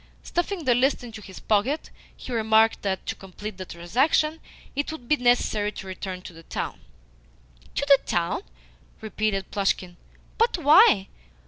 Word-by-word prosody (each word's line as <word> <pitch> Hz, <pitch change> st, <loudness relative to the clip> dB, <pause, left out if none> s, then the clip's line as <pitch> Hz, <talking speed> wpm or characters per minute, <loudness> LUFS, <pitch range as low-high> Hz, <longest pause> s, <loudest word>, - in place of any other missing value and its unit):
Stuffing 350 Hz, -1 st, -2 dB
the 250 Hz, -, +5 dB
list 260 Hz, +2 st, +2 dB
into 225 Hz, -3 st, -9 dB
his 190 Hz, -3 st, -11 dB
pocket, 225 Hz, +9 st, 0 dB, 0.3 s
he -, -, -9 dB
remarked 220 Hz, 0 st, +3 dB
that, 190 Hz, -2 st, -2 dB
to -, -, -2 dB
complete 195 Hz, +1 st, -9 dB
the 185 Hz, -, -6 dB
transaction, 265 Hz, -, +1 dB, 0.4 s
it 285 Hz, +2 st, -1 dB
would 310 Hz, -7 st, -9 dB
be 300 Hz, -, +4 dB
necessary 245 Hz, -5 st, +2 dB
to -, -, -8 dB
return 185 Hz, -1 st, -6 dB
to 180 Hz, -, -10 dB
the 165 Hz, -, -13 dB
town. -, -, -5 dB, 1.0 s
"To 280 Hz, -, 0 dB
the 280 Hz, -1 st, +7 dB
town?" 170 Hz, -1 st, -1 dB, 0.6 s
repeated 215 Hz, -2 st, -2 dB
Plushkin. 185 Hz, -3 st, -1 dB, 0.4 s
"But 460 Hz, -2 st, +3 dB
why? 300 Hz, -, +6 dB
220 Hz, 150 wpm, -25 LUFS, 195-280 Hz, 1.0 s, the